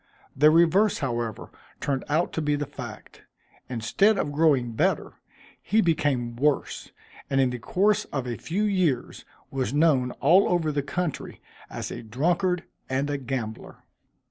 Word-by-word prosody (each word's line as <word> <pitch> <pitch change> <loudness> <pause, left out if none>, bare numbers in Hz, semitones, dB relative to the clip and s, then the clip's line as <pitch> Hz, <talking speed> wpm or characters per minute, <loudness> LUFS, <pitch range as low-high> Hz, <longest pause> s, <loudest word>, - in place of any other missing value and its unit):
The 150 +3 +6
reverse, 170 +6 +4
however, 120 -5 -3 0.3
turned 135 -2 -2
out 160 +4 +1
to 160 - -2
be 150 -1 +1
the 145 0 -2
fact. - - -10 0.5
Instead 130 - +2
of 145 - -1
growing 145 -6 +2
better, 110 - 0 0.5
he 215 - +1
became 145 - +1
worse; 145 +3 -1 0.4
and 135 -1 +1
in 130 -2 +3
the 125 - -5
course 205 - +1
of 135 -3 -4
a 120 -1 -3
few 185 - -2
years, 185 -11 0 0.3
was 135 -1 -2
known 145 -5 +3
all 175 +8 +4
over 170 -3 +1
the 145 -1 -1
country, 160 +2 -4 0.3
as - - -6
a - - -6
drunkard 175 - 0 0.3
and 135 +2 -1
a 145 - -1
gambler. 120 -4 -6
145 Hz, 150 wpm, -26 LUFS, 125-170 Hz, 0.5 s, The